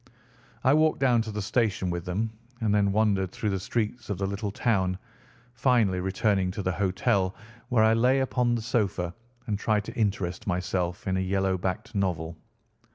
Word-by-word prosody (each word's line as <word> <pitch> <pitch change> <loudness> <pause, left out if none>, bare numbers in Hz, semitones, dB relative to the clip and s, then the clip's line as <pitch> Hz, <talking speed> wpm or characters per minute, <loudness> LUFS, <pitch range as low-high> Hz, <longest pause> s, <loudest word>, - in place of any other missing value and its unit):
I 130 - +5
walked 155 +1 +3
down 125 -4 +4
to 110 -1 -4
the 105 -1 -3
station 105 -5 0
with 85 0 -4
them, 105 +5 -1 0.3
and 110 -3 +1
then 100 -1 +3
wandered 100 -3 +2
through 105 +1 -2
the 95 - -1
streets 115 +4 -2
of 100 - -1
the 95 - -1
little 100 +2 -2
town, 95 -4 +1 0.6
finally 115 -6 +2
returning 95 +1 +1
to 105 -1 -4
the 95 - +1
hotel, 95 +1 +1 0.3
where 120 -4 +4
I 110 0 +5
lay 125 +4 +3
upon 125 -2 +1
the 115 - -3
sofa 100 -7 0 0.3
and 105 -3 -2
tried 105 0 +1
to - - -7
interest 100 -4 -1
myself 90 -1 -1
in 95 0 +1
a - - +1
yellow 95 0 +1
backed 95 0 -3
novel. 85 -5 -1
100 Hz, 180 wpm, -27 LUFS, 95-115 Hz, 0.6 s, I